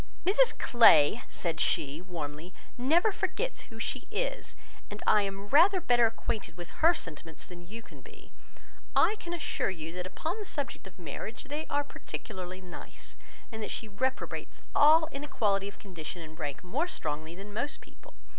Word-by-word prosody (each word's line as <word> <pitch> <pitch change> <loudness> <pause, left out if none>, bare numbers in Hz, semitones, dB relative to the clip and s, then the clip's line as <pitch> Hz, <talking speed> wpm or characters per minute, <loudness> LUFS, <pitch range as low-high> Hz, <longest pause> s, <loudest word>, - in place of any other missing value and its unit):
"Mrs 465 +7 +4
Clay," 225 -4 +6
said 170 -3 -2
she, 145 +3 +1
warmly, 165 -1 -6 0.2
"never 325 - +3
forgets - - -2
who - - -11
she - - -3
is; - - -2 0.3
and 205 - -7
as - - -15
I 210 - +6
am 195 0 -4
rather 365 +7 +7
better 240 -7 +4
acquainted 215 -5 -3
with 175 -1 -8
her 335 +2 +7
sentiments 165 - -8
than 175 -1 -11
you 225 +4 -8
can - - -14
be, - - -15 0.6
I 425 - +5
can 345 - -6
assure 345 - -1
you, 165 -3 -5
that 180 0 -4
upon 325 - -3
the 420 - -5
subject 285 - -4
of 190 - -14
marriage 175 - -6
they 295 +3 -4
are 290 0 +1
particularly 185 -9 -7
nice, 180 -1 -10 0.4
and 220 -1 -6
that - - -3
she 225 - -4
reprobates 260 +6 -3
all 315 +2 +7
inequality 210 -9 0
of 200 - -9
condition 170 -3 -7
and 160 +1 -12
rank 145 -1 -4
more 265 - 0
strongly 155 - -4
than 200 +2 -9
most 265 +8 -2
people. - - -17
205 Hz, 175 wpm, -30 LUFS, 175-290 Hz, 0.6 s, rather